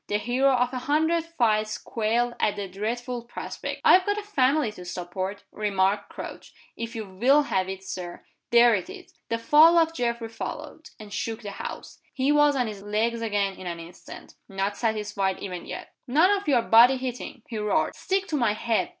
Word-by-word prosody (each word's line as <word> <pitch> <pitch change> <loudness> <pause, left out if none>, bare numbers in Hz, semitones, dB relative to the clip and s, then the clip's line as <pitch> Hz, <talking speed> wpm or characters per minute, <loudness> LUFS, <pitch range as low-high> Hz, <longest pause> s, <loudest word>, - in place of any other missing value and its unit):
The 205 - +1
hero 250 +5 +2
of 250 0 +1
a 255 - -2
hundred 320 +5 +1
fights 215 -9 0
quailed 235 +2 -1
at 210 - +1
the 200 -1 -4
dreadful 235 +5 -4
prospect. 240 - -6
"I've 370 - +7
got 410 +2 0
a 420 - -3
family 285 - +2
to 180 -4 -11
support," 185 +2 -5
remarked 200 -1 0
Crouch. - - -9 0.2
"If 230 +1 -6
you 220 -1 -4
will 250 +10 +3
have 190 -8 -1
it, 190 0 -6
Sir 180 -2 -7 0.2
there 235 0 +6
it 190 -4 -2
is!" - - -11 0.2
The 230 - 0
fall 305 +8 +6
of 325 -1 +3
Geoffrey 235 -4 -2
followed, 300 +7 -7
and 210 -2 -10
shook 225 +1 -4
the 205 - -5
house. - - -8 0.2
He 270 +1 +2
was 295 -1 +4
on 250 -2 +1
his 210 -3 -6
legs 220 +3 -1
again 205 -3 0
in 185 - -8
an 170 -1 -4
instant 170 +2 -12 0.2
not 195 +1 -2
satisfied 210 -4 -1
even 180 -3 -6
yet. - - -8
"None 315 +10 +4
of 405 -3 0
your 250 -5 +3
body 240 +4 +6
hitting!" 255 -1 -6
he 225 - -5
roared. 210 -1 +1
"Stick 385 0 -1
to 310 - -1
my 235 -7 +2
head. 230 +9 0
230 Hz, 195 wpm, -26 LUFS, 205-270 Hz, 0.2 s, I've